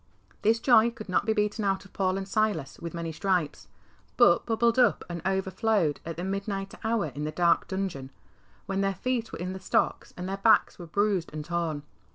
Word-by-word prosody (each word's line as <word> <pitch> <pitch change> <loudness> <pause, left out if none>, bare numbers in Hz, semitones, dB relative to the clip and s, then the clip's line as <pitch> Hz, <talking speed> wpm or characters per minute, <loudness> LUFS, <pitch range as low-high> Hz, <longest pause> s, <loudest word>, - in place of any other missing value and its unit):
This 225 +2 +3
joy 235 -1 +5
could 230 -4 -10
not 185 - +1
be 220 - +3
beaten 210 0 0
out 195 -1 0
of 195 - -17
Paul 190 -1 0
and 195 0 -4
Silas 195 -9 -1
with 170 0 -6
many 165 -1 -3
stripes, 175 -3 -1 0.5
but - - +5
bubbled 235 +1 +2
up 245 - +4
and 170 -1 -5
overflowed 190 - +1
at 165 - -5
the 175 - -4
midnight 195 0 -3
hour 220 -9 0
in 145 +3 -5
the 155 - -2
dark 170 +1 +2
dungeon, 190 -9 -4 0.6
when 195 0 -1
their 195 0 0
feet 240 +2 -2
were - - -6
in 180 +2 -4
the 190 - -7
stocks 190 - 0
and 180 +1 -5
their 195 +1 -3
backs 220 0 +3
were 175 - -8
bruised 200 0 0
and 155 -1 -5
torn. 165 -4 -2
195 Hz, 205 wpm, -28 LUFS, 170-215 Hz, 0.6 s, joy